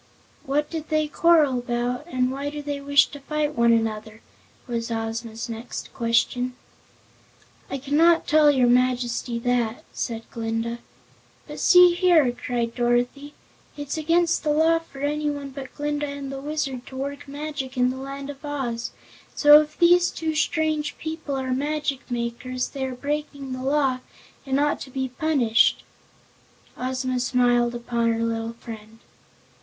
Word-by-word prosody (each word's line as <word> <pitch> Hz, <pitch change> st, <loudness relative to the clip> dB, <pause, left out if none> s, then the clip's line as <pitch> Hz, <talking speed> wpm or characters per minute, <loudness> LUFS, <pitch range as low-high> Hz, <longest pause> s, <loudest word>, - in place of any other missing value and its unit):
"What 295 Hz, +2 st, +1 dB
did 320 Hz, -2 st, -5 dB
they 310 Hz, -1 st, +1 dB
quarrel 300 Hz, -5 st, +4 dB
about, 245 Hz, +4 st, -2 dB
and 255 Hz, -5 st, 0 dB
why 280 Hz, +2 st, -3 dB
do 295 Hz, 0 st, -6 dB
they 285 Hz, -1 st, -4 dB
wish 285 Hz, 0 st, +5 dB
to 285 Hz, -, -9 dB
fight 300 Hz, +1 st, -2 dB
one 235 Hz, -3 st, +3 dB
another?" 220 Hz, -1 st, -1 dB, 0.4 s
was 235 Hz, -2 st, -3 dB
Ozma's 225 Hz, 0 st, -4 dB
next 230 Hz, +1 st, -7 dB
question. 245 Hz, +2 st, 0 dB, 1.1 s
"I 275 Hz, -, -3 dB
cannot 310 Hz, +5 st, +3 dB
tell 300 Hz, -1 st, +5 dB
your 265 Hz, -4 st, +4 dB
Majesty 245 Hz, -1 st, +1 dB
that," 240 Hz, -1 st, -1 dB
said 225 Hz, -2 st, -3 dB
Glinda. 225 Hz, +1 st, -3 dB, 0.7 s
"But -, -, -8 dB
see 360 Hz, -1 st, +7 dB
here!" 345 Hz, -7 st, +4 dB
cried 240 Hz, -1 st, -3 dB
Dorothy, 245 Hz, +4 st, 0 dB, 0.4 s
"it's 290 Hz, -1 st, -4 dB
against 335 Hz, +2 st, +1 dB
the 305 Hz, -, 0 dB
law 320 Hz, +2 st, +4 dB
for 280 Hz, -4 st, -13 dB
anyone 290 Hz, -1 st, -2 dB
but 265 Hz, -1 st, -9 dB
Glinda 295 Hz, 0 st, -2 dB
and 280 Hz, -1 st, -6 dB
the 270 Hz, 0 st, -6 dB
Wizard 275 Hz, -4 st, -3 dB
to 265 Hz, -, -10 dB
work 280 Hz, +2 st, -5 dB
magic 285 Hz, -2 st, -5 dB
in 250 Hz, 0 st, +3 dB
the 260 Hz, -, -6 dB
Land 275 Hz, +1 st, -6 dB
of 280 Hz, +1 st, -15 dB
Oz, 255 Hz, -5 st, -3 dB, 0.5 s
so 295 Hz, 0 st, +8 dB
if 305 Hz, 0 st, -8 dB
these 350 Hz, 0 st, +5 dB
two 320 Hz, -1 st, -3 dB
strange 310 Hz, -1 st, 0 dB
people 315 Hz, -3 st, -4 dB
are 260 Hz, -1 st, -2 dB
magic 290 Hz, 0 st, -2 dB
makers 245 Hz, +1 st, -3 dB
they 270 Hz, -2 st, -4 dB
are 260 Hz, -1 st, -4 dB
breaking 285 Hz, 0 st, -4 dB
the 255 Hz, -, -5 dB
law 270 Hz, -1 st, +1 dB, 0.5 s
and 270 Hz, +1 st, +1 dB
ought 295 Hz, 0 st, +1 dB
to 270 Hz, -, -7 dB
be 265 Hz, 0 st, -3 dB
punished!" 255 Hz, -6 st, +2 dB, 0.9 s
Ozma 255 Hz, 0 st, -2 dB
smiled 245 Hz, -1 st, +2 dB
upon 235 Hz, -1 st, 0 dB
her 230 Hz, 0 st, -1 dB
little 230 Hz, 0 st, -2 dB
friend. 225 Hz, -1 st, -10 dB
270 Hz, 150 wpm, -24 LUFS, 240-295 Hz, 1.1 s, so